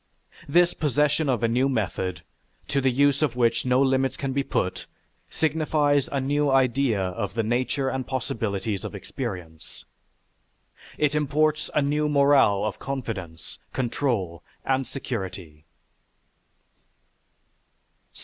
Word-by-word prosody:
This 175 Hz, +3 st, +4 dB
possession 150 Hz, 0 st, +1 dB
of 120 Hz, -2 st, 0 dB
a -, -, +4 dB
new 125 Hz, +4 st, +2 dB
method, 95 Hz, -6 st, -2 dB, 0.5 s
to 140 Hz, -, +1 dB
the 135 Hz, -, +3 dB
use 140 Hz, +2 st, +3 dB
of 145 Hz, -6 st, +1 dB
which 120 Hz, -1 st, +2 dB
no 125 Hz, 0 st, +3 dB
limits 135 Hz, 0 st, +1 dB
can 135 Hz, -1 st, -3 dB
be 140 Hz, -, +1 dB
put, 95 Hz, -8 st, -2 dB, 0.4 s
signifies 150 Hz, -2 st, +1 dB
a 140 Hz, -, 0 dB
new 145 Hz, +2 st, +1 dB
idea 130 Hz, -3 st, +2 dB
of 95 Hz, +2 st, -3 dB
the 115 Hz, -, +1 dB
nature 125 Hz, +4 st, 0 dB
and 130 Hz, -1 st, -2 dB
possibilities 110 Hz, -5 st, -2 dB
of -, -, -6 dB
experience. 95 Hz, -, -7 dB, 1.1 s
It 150 Hz, -1 st, +2 dB
imports 150 Hz, +1 st, +1 dB
a 150 Hz, -, +3 dB
new 150 Hz, +1 st, +1 dB
morale 140 Hz, -8 st, +4 dB
of 105 Hz, -3 st, -3 dB
confidence, 105 Hz, -12 st, -6 dB
control, 115 Hz, -, -1 dB, 0.2 s
and 135 Hz, -1 st, +1 dB
security. 95 Hz, -, -6 dB
130 Hz, 120 wpm, -25 LUFS, 105-140 Hz, 1.1 s, This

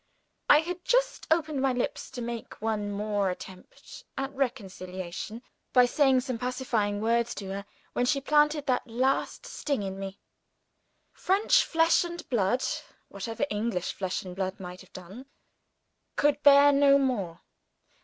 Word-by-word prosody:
I 295 Hz, -, +8 dB
had 355 Hz, +2 st, -6 dB
just -, -, +1 dB
opened 310 Hz, -3 st, +1 dB
my 265 Hz, -1 st, +2 dB
lips 245 Hz, -, -3 dB
to 245 Hz, -, -6 dB
make 235 Hz, -1 st, -6 dB
one 215 Hz, -2 st, -2 dB
more 205 Hz, -1 st, 0 dB
attempt 185 Hz, 0 st, -10 dB
at 270 Hz, 0 st, -3 dB
reconciliation, 195 Hz, -5 st, -4 dB, 0.3 s
by 250 Hz, -1 st, +7 dB
saying 265 Hz, 0 st, +3 dB
some 250 Hz, -2 st, -4 dB
pacifying 240 Hz, -5 st, -1 dB
words 235 Hz, +1 st, +1 dB
to 195 Hz, -2 st, -6 dB
her 200 Hz, +1 st, -5 dB, 0.3 s
when 245 Hz, -, +1 dB
she 280 Hz, +1 st, +2 dB
planted 295 Hz, +1 st, +2 dB
that 250 Hz, -1 st, 0 dB
last 255 Hz, +4 st, 0 dB
sting 280 Hz, -8 st, -2 dB
in 195 Hz, 0 st, -5 dB
me. 195 Hz, 0 st, -6 dB, 0.9 s
French 415 Hz, +6 st, +3 dB
flesh 330 Hz, +1 st, +3 dB
and 345 Hz, -1 st, -7 dB
blood 240 Hz, +2 st, +1 dB, 0.5 s
(whatever 225 Hz, +7 st, -3 dB
English 210 Hz, -4 st, -2 dB
flesh 190 Hz, -2 st, -3 dB
and 180 Hz, -1 st, -8 dB
blood 190 Hz, 0 st, -3 dB
might 180 Hz, -1 st, -8 dB
have -, -, -17 dB
done) 195 Hz, +9 st, -11 dB, 0.9 s
could 290 Hz, 0 st, +2 dB
bear 285 Hz, 0 st, +7 dB
no 280 Hz, 0 st, +5 dB
more. 205 Hz, -11 st, -1 dB
245 Hz, 145 wpm, -28 LUFS, 200-280 Hz, 0.9 s, I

